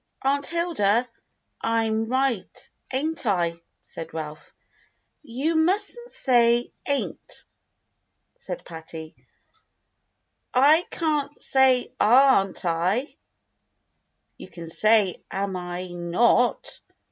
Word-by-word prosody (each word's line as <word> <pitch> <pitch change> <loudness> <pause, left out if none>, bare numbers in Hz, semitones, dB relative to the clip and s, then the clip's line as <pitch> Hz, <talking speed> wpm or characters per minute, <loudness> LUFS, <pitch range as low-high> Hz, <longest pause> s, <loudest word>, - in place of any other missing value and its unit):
"Aunt 280 +1 +1
Hilda, 255 - +1 0.5
I'm 225 -1 0
right, 260 -4 -2 0.2
ain't 305 +5 -2
I.?" 170 -4 0 0.2
said 165 0 -9
Ralph. 155 -1 -7 0.7
"You 290 +5 -2
mustn't 410 +9 0
say 240 -2 +2
* - - -19
ain't,'" 280 -1 -4 0.9
said - - -8
Patty. 160 -1 -9 1.4
"Ican't 300 +1 +2
say 265 -2 +2
'aren't 230 -6 +4
I.'" 180 - 0 1.2
"You - - -10
can 165 -2 -10
say 215 -1 +2
*am 195 0 -3
I 180 0 -5
not.'" 175 +8 +1
235 Hz, 90 wpm, -25 LUFS, 180-280 Hz, 1.4 s, aren't